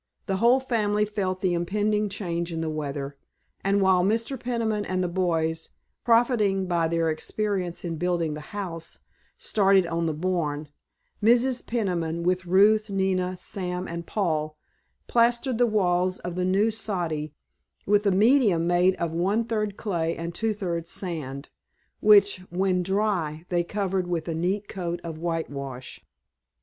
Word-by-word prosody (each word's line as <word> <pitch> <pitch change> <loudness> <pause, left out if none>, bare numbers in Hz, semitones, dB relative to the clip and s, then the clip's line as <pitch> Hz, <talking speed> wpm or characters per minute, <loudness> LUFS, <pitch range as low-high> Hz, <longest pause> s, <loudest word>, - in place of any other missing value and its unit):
The 195 - -1
whole 240 +5 +5
family 210 -5 +1
felt 195 -3 -2
the 185 -2 +1
impending 210 +4 0
change 170 -4 -3
in 165 -1 -3
the 160 -1 -2
weather, 140 -2 -4 0.5
and 195 0 +2
while 185 -1 +4
Mr. 225 +7 0
Peniman 230 -4 -1
and 185 -2 -1
the - - 0
boys, 165 -3 -1 0.3
profiting 230 -5 +3
by 170 -2 +1
their 165 -1 +1
experience 185 +1 -3
in 165 -2 -3
building 170 -2 0
the 150 - -6
house, 175 -5 -5 0.4
started 195 -3 +3
on 170 0 -1
the 155 - -1
barn, 155 -3 -2 0.5
Mrs. 245 +3 +3
Peniman 170 -7 -1
with 180 +1 0
Ruth, 210 +4 +4
Nina, 185 -2 0
Sam 180 -1 -4
and 170 0 -6
Paul, 155 -6 -1 0.5
plastered 240 +1 +2
the 245 - +5
walls 185 -3 +1
of 175 - -6
the 180 0 0
new 200 +4 +3
"soddy" 170 -9 -3 0.5
with 205 +1 +3
a - - +4
medium 205 -4 +4
made 175 +2 +3
of 170 -1 -2
one 195 +7 +1
third 210 -3 -2
clay 170 -6 -1
and 170 +1 -4
two 220 +2 -1
thirds 170 -5 -3
sand, 150 -7 -5 0.5
which, 205 -2 +6
when 185 +1 +1
dry, 180 -5 -1
they 175 -1 +1
covered 190 -1 -2
with 175 -2 -2
a 165 - -1
neat 190 +5 -1
coat 175 -3 -4
of 165 -2 -6
whitewash. 140 -6 -4
185 Hz, 150 wpm, -26 LUFS, 170-210 Hz, 0.5 s, which